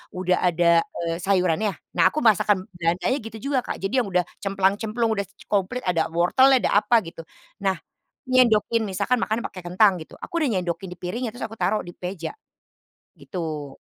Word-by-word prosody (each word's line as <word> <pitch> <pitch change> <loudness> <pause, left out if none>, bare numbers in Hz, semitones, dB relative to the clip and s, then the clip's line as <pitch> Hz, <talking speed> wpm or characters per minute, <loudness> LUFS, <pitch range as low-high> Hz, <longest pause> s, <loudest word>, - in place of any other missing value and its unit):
udah 185 0 +1
ada, 170 -1 +4 0.3
eee, 165 0 -1
sayurannya. 190 +1 +1 0.2
Nah, 170 - +5
aku 305 - -2
masakan 205 -3 +3
Belandanya 175 +10 0
gitu 225 -2 -9
juga 270 - +3
Kak, - - -3
jadi 220 +7 +1
yang - - -6
udah 180 0 +3 0.2
cemplang-cemplung, 205 +4 0
udah 200 -1 -2
ce - - -19
komplit, 205 +5 0
ada 170 -3 +1
wortelnya, 260 +11 +5
ada - - +1
apa 230 0 +4
gitu. 165 - -10 0.4
Nah, 190 -1 +2 0.5
nyendokin, 235 -3 +3
misalkan 200 +6 0
makanya 225 +2 -1
pakai 185 - -9
kentang 185 +1 +4
gitu, 155 - -11
aku - - -9
udah 295 - +2
nyendokin 180 +2 -4
di - - -7
piringnya, 230 +8 -3
terus 245 - -6
aku 220 - -8
taruh 215 - +1
di 175 - -9
meja, 180 -1 -5 0.8
gitu 155 -6 -6
195 Hz, 175 wpm, -24 LUFS, 175-225 Hz, 0.8 s, Nah